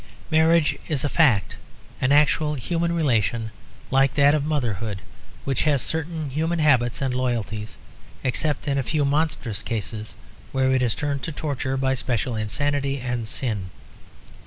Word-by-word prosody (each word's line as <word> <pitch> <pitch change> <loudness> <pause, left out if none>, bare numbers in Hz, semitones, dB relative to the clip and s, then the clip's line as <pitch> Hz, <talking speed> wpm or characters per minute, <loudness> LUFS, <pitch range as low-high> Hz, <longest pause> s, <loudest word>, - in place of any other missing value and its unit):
Marriage 160 0 +3
is 145 -4 0
a 145 - 0
fact, 125 - +3 0.4
an 130 - +2
actual 150 +1 +3
human 170 +6 -1
relation 115 - +1 0.4
like 135 +1 +3
that 145 0 +5
of 150 -2 +1
motherhood 115 -9 -2 0.5
which 135 -3 0
has 150 -3 +2
certain 160 +1 -2
human 160 +5 0
habits 130 -5 +2
and 130 -2 0
loyalties, 115 -4 -2 0.5
except 145 +4 +1
in 140 -1 +1
a - - +2
few 145 +4 0
monstrous 140 -7 -1
cases 110 -1 -4 0.4
where 130 -1 +2
it 130 -1 +2
is 120 -3 +1
turned 145 -3 -2
to 165 - -4
torture 140 -3 -2
by 130 0 +1
special 125 -2 0
insanity 140 +5 -1
and 125 -2 -3
sin. 110 -6 -2
135 Hz, 150 wpm, -24 LUFS, 120-150 Hz, 0.5 s, that